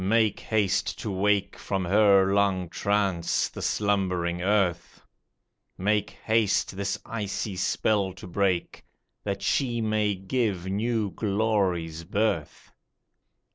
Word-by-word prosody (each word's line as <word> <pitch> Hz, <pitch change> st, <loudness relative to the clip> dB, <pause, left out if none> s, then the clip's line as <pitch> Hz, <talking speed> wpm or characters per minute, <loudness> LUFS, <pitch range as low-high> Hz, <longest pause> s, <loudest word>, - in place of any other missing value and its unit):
make 110 Hz, +1 st, +2 dB
haste 100 Hz, -3 st, 0 dB
to 105 Hz, -, -4 dB
wake 100 Hz, +1 st, +1 dB
From 95 Hz, -2 st, -3 dB
her 100 Hz, 0 st, +4 dB
long 95 Hz, -3 st, +1 dB
trance 100 Hz, -3 st, 0 dB
the -, -, -8 dB
slumbering 90 Hz, -4 st, 0 dB
earth; 90 Hz, -3 st, 0 dB, 0.8 s
Make 105 Hz, +2 st, +1 dB, 0.2 s
haste 110 Hz, -3 st, +2 dB
this 100 Hz, +1 st, -2 dB
icy 105 Hz, -2 st, -3 dB
spell 95 Hz, +1 st, +1 dB
to 95 Hz, -, -11 dB
break, 95 Hz, -1 st, -1 dB, 0.4 s
That 100 Hz, -1 st, -3 dB
she 120 Hz, +1 st, +1 dB
may 110 Hz, -2 st, +1 dB
give 95 Hz, -1 st, -1 dB
new 105 Hz, +1 st, -1 dB
glories 95 Hz, -6 st, 0 dB
birth 95 Hz, -4 st, -2 dB
100 Hz, 110 wpm, -26 LUFS, 95-105 Hz, 0.8 s, her